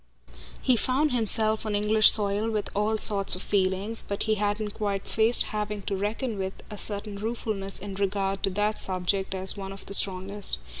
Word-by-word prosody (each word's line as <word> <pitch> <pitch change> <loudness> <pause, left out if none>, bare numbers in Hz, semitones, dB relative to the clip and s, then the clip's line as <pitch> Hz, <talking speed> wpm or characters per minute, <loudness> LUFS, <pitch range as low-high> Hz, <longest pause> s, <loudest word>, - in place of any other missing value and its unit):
He 255 - +4
found 270 +6 +1
himself 220 -2 +2
on 215 -2 -2
English 210 +1 +6
soil 205 +1 +1
with 215 -2 -3
all 210 +2 +1
sorts 200 -3 0
of 185 - -6
feelings, 195 +3 0
but 200 - -2
he 220 - +1
hadn't 210 0 -1
quite 200 -2 -3
faced 225 +2 +3
having 210 -1 -3
to 195 - -2
reckon 210 +3 -3
with 190 0 -3 0.2
a 210 - -7
certain 205 0 -3
ruefulness 215 -3 -3
in 200 0 -7
regard 195 0 -1
to 195 - +1
that 210 +3 0
subject 190 +1 -1
as 190 0 +1
one 195 -1 -6
of 195 0 -8
the 200 - -7
strongest. 195 - +3
205 Hz, 185 wpm, -26 LUFS, 195-215 Hz, 0.2 s, English